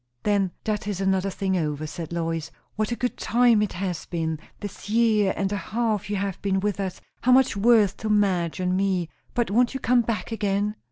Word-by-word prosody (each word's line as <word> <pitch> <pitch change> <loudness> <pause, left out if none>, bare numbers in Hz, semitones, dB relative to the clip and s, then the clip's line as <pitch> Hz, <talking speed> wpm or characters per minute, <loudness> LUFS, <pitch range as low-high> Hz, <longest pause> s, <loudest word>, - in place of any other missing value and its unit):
"Then 200 -2 +2
that 210 -2 -2
is 200 -3 -2
another 190 0 +1
thing 190 0 -1
over," 155 -3 -1
said 160 +1 -6
Lois. 165 -2 -2 0.3
"What 215 +2 -1
a - - 0
good 250 +1 -2
time 235 -2 +4
it 210 - -1
has 180 -1 -4
been, 160 -2 -2 0.2
this 205 -1 -8
year 215 -3 +3
and 195 0 0
a - - 0
half 215 +1 -1
you 205 - -1
have 195 -1 -3
been 195 -1 +1
with 205 0 -1
us! 190 -2 -3 0.2
how 255 - +3
much 260 -3 +5
worth 210 -1 +4
to 220 - -4
Madge 190 -5 +1
and 180 0 0
me! 185 -3 0 0.3
But 240 -5 0
won't 245 +4 +3
you - - -2
come 245 0 +3
back 225 -3 -3
again?" 205 -1 0
200 Hz, 210 wpm, -25 LUFS, 185-215 Hz, 0.3 s, much